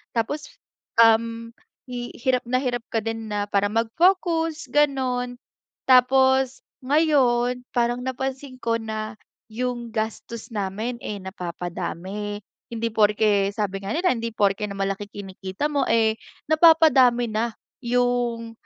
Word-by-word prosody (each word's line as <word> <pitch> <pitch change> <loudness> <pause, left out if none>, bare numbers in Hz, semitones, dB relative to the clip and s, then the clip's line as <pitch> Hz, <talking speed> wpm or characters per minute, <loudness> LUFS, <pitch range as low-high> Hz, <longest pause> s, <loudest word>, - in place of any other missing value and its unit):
tapos, 285 +6 -2 0.5
um, 230 0 +4 0.4
hi 245 -1 -5
hirap 255 0 +1
na 255 +1 +1
hirap 245 -3 -2
ka 225 - 0
din 225 -1 -4
na 205 -1 -1
para 205 0 +1
mag-focus 325 - +1
ganun. 255 -4 +1 0.5
Tapos 265 0 +4 0.2
ngayon, 255 -4 +2
parang 240 0 0
napansin 260 +1 -4
ko 230 -2 0
na 215 0 -5 0.4
'yong 240 0 -3
gastos 220 +1 -4
namin, 210 +4 -3
eh, 210 - -4
napapadami. 185 +2 -5 0.3
Hindi 230 0 -2
porke 210 -2 +3
sabi 200 -2 -2
nga 200 - -3
nila 360 +3 +2
hindi 230 0 -4
porke 205 +1 +1
na 200 - -7
malaki 195 +1 -2
kinikita 195 +7 -5
mo, 285 -1 +1
eh, 220 -1 +3 0.4
napapadami 305 -7 +6
na 225 +2 -1 0.3
'yong 240 -1 0
235 Hz, 120 wpm, -24 LUFS, 215-255 Hz, 0.5 s, napapadami